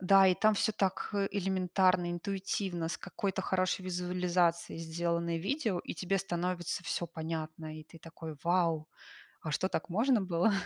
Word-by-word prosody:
да, 195 Hz, +1 st, +7 dB
и 185 Hz, -, +5 dB
там 215 Hz, +2 st, +4 dB
всё 220 Hz, +1 st, +2 dB
так, 195 Hz, -2 st, 0 dB
э, 200 Hz, -1 st, +1 dB
элементарно, 185 Hz, -2 st, +2 dB
интуитивно, 185 Hz, -1 st, -2 dB
с -, -, -3 dB
какой-то 195 Hz, 0 st, -2 dB
хорошей 185 Hz, 0 st, 0 dB
визуализацией 180 Hz, -2 st, 0 dB
сделаны 170 Hz, 0 st, -1 dB
видео 220 Hz, -, 0 dB
и -, -, -6 dB
тебе 185 Hz, +3 st, 0 dB
становится 175 Hz, -1 st, -2 dB
всё 175 Hz, -, -1 dB
понятно. 160 Hz, -1 st, -5 dB
И 155 Hz, -, -10 dB
ты 165 Hz, -, -14 dB
такой: 160 Hz, -2 st, -8 dB
"Вау! 165 Hz, -3 st, +2 dB, 0.5 s
А 155 Hz, -, -3 dB
что, 185 Hz, -, +1 dB
так 165 Hz, -, -2 dB
можно 225 Hz, +6 st, +3 dB
было?" 185 Hz, +2 st, +2 dB
180 Hz, 160 wpm, -32 LUFS, 170-190 Hz, 0.5 s, да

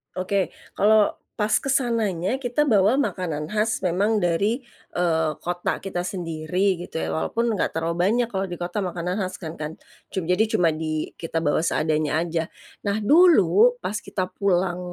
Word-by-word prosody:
Oke. 185 Hz, +1 st, -1 dB, 0.2 s
Kalau 210 Hz, 0 st, +4 dB, 0.2 s
pas 210 Hz, 0 st, 0 dB
ke 275 Hz, -, -4 dB
sananya 230 Hz, -4 st, 0 dB
kita 245 Hz, +4 st, +1 dB
bawa 215 Hz, 0 st, +4 dB
makanan 175 Hz, -, -1 dB
khas 215 Hz, 0 st, 0 dB
memang 200 Hz, +5 st, +2 dB
dari, 200 Hz, +5 st, +1 dB, 0.4 s
eee, 160 Hz, -3 st, +2 dB
kota 175 Hz, 0 st, -2 dB
kita 185 Hz, -2 st, -4 dB
sendiri 180 Hz, +1 st, -1 dB
gitu 175 Hz, -, -6 dB
ya -, -, -2 dB
walaupun 230 Hz, +7 st, 0 dB
nggak 185 Hz, -, -1 dB
terlalu 170 Hz, +3 st, +1 dB
banyak 240 Hz, +2 st, +2 dB
kalau 190 Hz, -1 st, -2 dB
di 175 Hz, -, -5 dB
kota 175 Hz, +4 st, -3 dB
makanan 180 Hz, +1 st, -3 dB
khas 185 Hz, 0 st, -3 dB
kan 160 Hz, -3 st, -7 dB
kan. 155 Hz, +1 st, -5 dB, 0.3 s
Cum 190 Hz, -, -3 dB
jadi 180 Hz, +6 st, +2 dB
cuma 180 Hz, -7 st, +3 dB
di 155 Hz, 0 st, -3 dB
kita 165 Hz, -1 st, -4 dB
bawa 145 Hz, -, +2 dB
seadanya 155 Hz, -2 st, 0 dB
aja. 165 Hz, -1 st, -2 dB, 0.4 s
Nah 200 Hz, +1 st, +1 dB
dulu 245 Hz, -, +5 dB
pas 195 Hz, +4 st, -2 dB
kita 185 Hz, -, -3 dB
pulang 180 Hz, -2 st, +1 dB
185 Hz, 165 wpm, -24 LUFS, 170-215 Hz, 0.4 s, dulu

